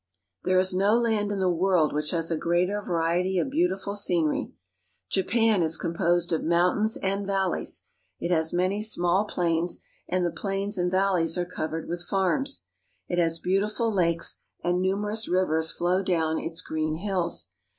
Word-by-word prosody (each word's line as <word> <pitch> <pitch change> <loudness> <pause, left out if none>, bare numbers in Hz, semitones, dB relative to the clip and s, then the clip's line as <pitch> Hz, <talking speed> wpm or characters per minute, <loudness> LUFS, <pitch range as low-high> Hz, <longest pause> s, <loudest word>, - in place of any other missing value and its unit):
There 185 0 +2
is 185 0 +3
no 200 +4 +3
land 220 -3 +1
in 200 - -2
the 190 - +2
world 175 -3 +2
which 150 0 -1
has 165 -1 -1
a - - +2
greater 180 +5 0
variety 175 +1 0
of 270 - 0
beautiful 275 - 0
scenery. 175 -6 0 0.6
Japan 215 +1 +2
is 160 -1 +1
composed 170 0 0
of 160 - 0
mountains 180 +6 +2
and 195 +1 -2
valleys. 195 -2 -1 0.4
It 175 - -2
has 160 -2 +2
many 185 +4 0
small 190 -2 +2
plains, 170 -3 0 0.3
and 180 0 +1
the 170 - 0
plains 195 +2 -2
and 180 0 +1
valleys 185 -3 +1
are 175 - 0
covered 160 -2 -4
with 175 +1 -3
farms. 195 +9 0 0.4
It 175 - -1
has 165 -1 +2
beautiful 210 +6 0
lakes, 170 -3 +1 0.2
and 180 +1 +1
numerous 205 +4 0
rivers 160 -3 +2
flow 180 +2 0
down 160 -4 0
its 165 +1 -4
green 155 -2 -2
hills. 175 - -2
180 Hz, 160 wpm, -26 LUFS, 170-195 Hz, 0.6 s, is